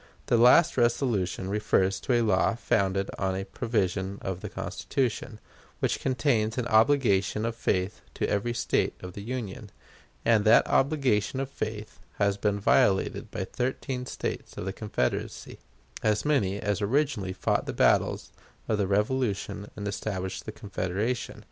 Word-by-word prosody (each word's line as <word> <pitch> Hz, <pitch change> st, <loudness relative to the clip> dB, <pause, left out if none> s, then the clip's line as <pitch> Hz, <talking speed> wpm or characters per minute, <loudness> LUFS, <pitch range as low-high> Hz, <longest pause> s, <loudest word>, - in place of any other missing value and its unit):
The -, -, +2 dB
last 125 Hz, +8 st, +6 dB
resolution 115 Hz, -7 st, +1 dB
refers 100 Hz, -1 st, +1 dB
to 130 Hz, -, -1 dB
a 120 Hz, -1 st, +3 dB
law 110 Hz, 0 st, +2 dB
founded 100 Hz, -4 st, 0 dB
on 95 Hz, -1 st, 0 dB
a 95 Hz, +1 st, -3 dB
provision 100 Hz, -3 st, -1 dB
of 95 Hz, -2 st, -3 dB
the -, -, -5 dB
Constitution, 120 Hz, -3 st, -3 dB, 0.4 s
which -, -, 0 dB
contains 125 Hz, -4 st, +1 dB
an 125 Hz, -, 0 dB
obligation 110 Hz, -3 st, +3 dB
of 115 Hz, 0 st, -2 dB
faith 95 Hz, -3 st, -1 dB
to -, -, -1 dB
every 120 Hz, +4 st, -1 dB
State 120 Hz, -, 0 dB
of 90 Hz, -1 st, -8 dB
the 100 Hz, -, -7 dB
Union; 110 Hz, -2 st, -5 dB, 0.6 s
and 115 Hz, -2 st, +4 dB
that 110 Hz, +2 st, +6 dB
obligation 135 Hz, -5 st, +1 dB
of 135 Hz, 0 st, -3 dB
faith 110 Hz, -4 st, -5 dB, 0.2 s
has 100 Hz, -1 st, +2 dB
been 100 Hz, 0 st, 0 dB
violated 95 Hz, -1 st, +2 dB
by -, -, -4 dB
thirteen 125 Hz, 0 st, -3 dB
States -, -, -5 dB
of -, -, -4 dB
the 95 Hz, -, -3 dB
Confederacy 105 Hz, -, -3 dB, 0.4 s
as 105 Hz, +2 st, +1 dB
many 105 Hz, -10 st, +1 dB
as 105 Hz, -1 st, -1 dB
originally 120 Hz, -3 st, 0 dB
fought 95 Hz, -, -1 dB
the -, -, -1 dB
battles -, -, +2 dB, 0.4 s
of 110 Hz, -2 st, 0 dB
the 100 Hz, -, +1 dB
Revolution 105 Hz, -1 st, -1 dB
and 105 Hz, -1 st, -5 dB
established 95 Hz, -2 st, -4 dB
the -, -, -3 dB
Confederation. 105 Hz, +4 st, -3 dB
105 Hz, 150 wpm, -27 LUFS, 100-120 Hz, 0.6 s, last